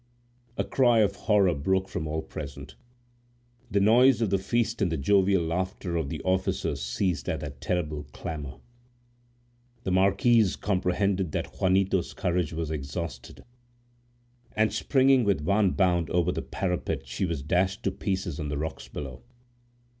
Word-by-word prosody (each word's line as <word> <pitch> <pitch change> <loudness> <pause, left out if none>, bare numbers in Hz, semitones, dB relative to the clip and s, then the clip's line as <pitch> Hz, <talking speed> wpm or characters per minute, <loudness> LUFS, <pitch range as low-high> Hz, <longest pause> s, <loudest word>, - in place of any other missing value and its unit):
A - - +1
cry 120 -4 +3
of 100 -1 +2
horror 100 -5 +3
broke 95 +6 0
from 80 - -4
all 80 +1 -2
present. 70 -2 -8 1.0
The 100 - +2
noise 120 +5 +5
of 110 -4 0
the 100 - +2
feast 115 +3 -1
and 90 -4 +2
the 80 - -1
jovial 95 +4 +3
laughter 90 +2 -3
of 80 -4 -1
the 75 -3 -5
officers 95 -6 -1
ceased 75 +6 -1
at - - -2
that 70 -3 -8
terrible 75 -4 -2
clamor. 75 -3 -6 1.3
The 95 - -2
marquise 100 +3 +3
comprehended 95 -2 0
that - - -4
Juanito's 95 -1 +1
courage 90 -3 0
was 80 -1 -3
exhausted, 70 -2 -6 1.1
and 110 -1 +1
springing 130 +3 +3
with 100 -7 +1
one 100 +5 +3
bound 90 -5 +2
over 90 0 +1
the - - -3
parapet, 85 -6 -3
she 65 +8 -2
was 80 -5 -3
dashed 90 +6 0
to 100 - +1
pieces 95 -5 -3
on 75 -2 -3
the 75 - -2
rocks 80 +2 -5
below. 65 -4 -7
90 Hz, 150 wpm, -27 LUFS, 80-100 Hz, 1.3 s, noise